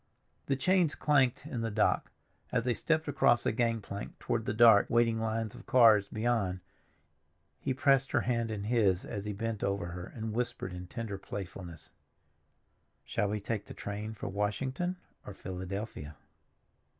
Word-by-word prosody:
The 135 - +2
chains 175 +3 +2
clanked 135 -3 +2
in 130 -7 -4
the 115 - -1
dock. 105 0 +1 0.4
As 125 -2 0
they 125 - +2
stepped 160 +5 0
across 135 -4 +3
the - - +2
gangplank 110 -3 -2
toward 110 -2 -2
the - - 0
dark, 110 -3 +7
waiting 115 -1 +3
lines 110 -1 -2
of - - -13
cars 110 -5 +6
beyond, 110 -5 0 1.0
he - - -2
pressed 135 0 +3
her - - +2
hand 115 -2 0
in 105 -2 -4
his 105 -5 +2
as 100 -3 -5
he 105 - -2
bent 110 +1 -3
over 100 -3 -1
her, 90 0 -6
and 110 -1 -4
whispered 120 -5 -3
in 90 0 -7
tender 110 -2 -5
playfulness, 90 -4 -8 1.1
"Shall 105 - 0
we 105 +1 -1
take 105 +1 -3
the - - -10
train 105 +2 -5
for - - -6
Washington 130 - -1 0.3
or 100 - -9
Philadelphia?" 95 -4 -6
110 Hz, 160 wpm, -31 LUFS, 100-120 Hz, 1.1 s, dark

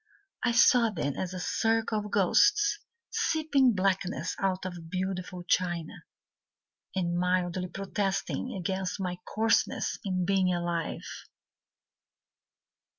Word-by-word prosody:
I 245 - +2
saw 235 0 +6
them 150 -8 -2
as 185 - -3
a 185 - -5
circle 225 +4 +1
of 210 0 -6
ghosts 410 - +3 0.3
Sipping 285 -7 +2
blackness 190 -1 0
out 190 -1 -1
of 175 -3 -7
beautiful 185 0 -3
china, 175 -2 0 1.0
And 175 -2 0
mildly 180 0 0
protesting 195 +5 -2
against 190 +1 -2
my 180 -2 -3
coarseness 225 +1 +1
In 185 -3 -1
being 190 -1 +2
alive. 175 -1 -2
185 Hz, 105 wpm, -29 LUFS, 180-210 Hz, 1.0 s, saw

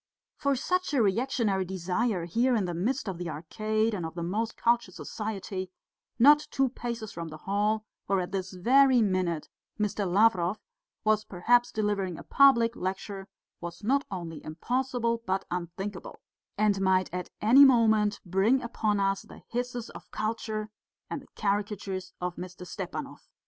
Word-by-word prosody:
For 280 -2 +1
such 365 +4 0
a 255 - +4
reactionary 210 -2 +1
desire 185 +2 -1
here, 240 +9 +2
in 210 -4 +1
the 175 - -3
midst 220 +8 -1
of 185 -3 -4
the 175 -1 -4
Arcade 215 +8 -1
and 185 -4 -3
of 160 0 -5
the 170 - -3
most 220 +6 -2
cultured 235 0 +1
society, 195 -3 -5 0.5
not 295 +4 +6
two 270 -2 +1
paces 235 -3 -5
from 170 0 -6
the 155 -1 -8
hall 210 +5 0 0.2
where 195 0 +2
at 180 0 -3
this 190 -1 -3
very 250 +6 +5
minute 185 -5 0 0.3
Mr. 205 -3 -1
Lavrov 195 -2 +3 0.5
was 215 0 +3
perhaps 240 +6 +2
delivering 200 -5 -1
a - - -9
public 235 -4 +5
lecture, 195 +1 -4 0.3
was 170 +3 -8
not 275 +6 +2
only 170 -5 -6
impossible 235 +7 -1
but 190 +1 0
unthinkable, 180 +3 -5 0.4
and 205 -2 +2
might 185 -2 +2
at 180 0 -4
any 250 +6 +7
moment 220 -5 +4
bring 195 +8 +3
upon 215 -3 0
us 195 0 +1
the - - -14
hisses 245 -1 -3
of - - -12
culture 215 -1 -3 0.4
and - - -3
the - - -18
caricatures 200 -2 -2
of 180 -1 -3
Mr. 180 0 -8
Stepanov. - - -6
205 Hz, 155 wpm, -28 LUFS, 185-235 Hz, 0.5 s, any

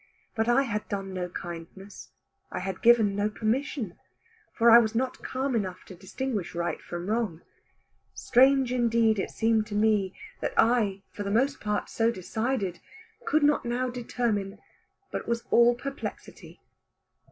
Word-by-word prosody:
But 225 +1 0
I 255 +3 +4
had 210 -5 -4
done 195 -2 -4
no 180 -1 -3
kindness, 175 +3 -9 0.4
I - - -4
had 190 -1 -4
given 225 -4 +5
no 205 +1 +1
permission; 225 - -2 0.5
for 235 0 +4
I 235 - +10
was 220 -1 0
not 255 +2 -1
calm 260 0 -2
enough 185 -4 -3
to - - -11
distinguish 200 +1 -4
right 170 0 -2
from 175 0 -6
wrong. 210 -6 -1 0.7
Strange 265 0 +4
indeed 230 -3 +2
it - - -2
seemed 225 -1 +1
to 210 - -5
me 210 -3 +2 0.2
that - - -3
I, 215 -5 +2
for - - -8
the 200 - -3
most 265 +7 +1
part 210 0 -1
so 225 0 +1
decided, 220 -1 -2 0.5
could 310 0 +2
not 295 0 +3
now 245 +1 -1
determine, 230 -5 -2 0.5
but - - -4
was 235 0 -1
all 240 0 +6
perplexity. 275 +3 -8
225 Hz, 150 wpm, -27 LUFS, 195-240 Hz, 0.7 s, I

